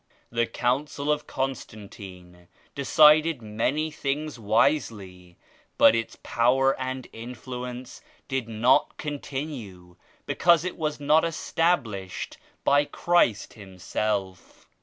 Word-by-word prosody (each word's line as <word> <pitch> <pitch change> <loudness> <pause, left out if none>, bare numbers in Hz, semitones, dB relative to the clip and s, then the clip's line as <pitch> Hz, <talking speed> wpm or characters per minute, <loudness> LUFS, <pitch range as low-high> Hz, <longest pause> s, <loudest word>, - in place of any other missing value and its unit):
The 115 0 +1
Council 140 +3 -1
of 150 0 -1
Constant 120 -6 -5
ine 90 -3 -12 0.3
decided 150 0 +5
many 135 +9 -1
things 150 -1 -3
wisely 105 - 0 0.4
but - - +7
its 115 0 -2
power 130 +3 +2
and 130 -1 -4
influence 125 +1 -7 0.3
did 130 -3 -2
not 115 +4 +2
continue 130 - -6 0.3
because 170 -1 +3
it 185 - -3
was 155 -2 -2
not 150 +2 +4
established 160 - -1 0.3
by 145 +1 +4
Christ 160 - +1
Himself. 95 -1 -4
125 Hz, 100 wpm, -26 LUFS, 105-150 Hz, 0.4 s, but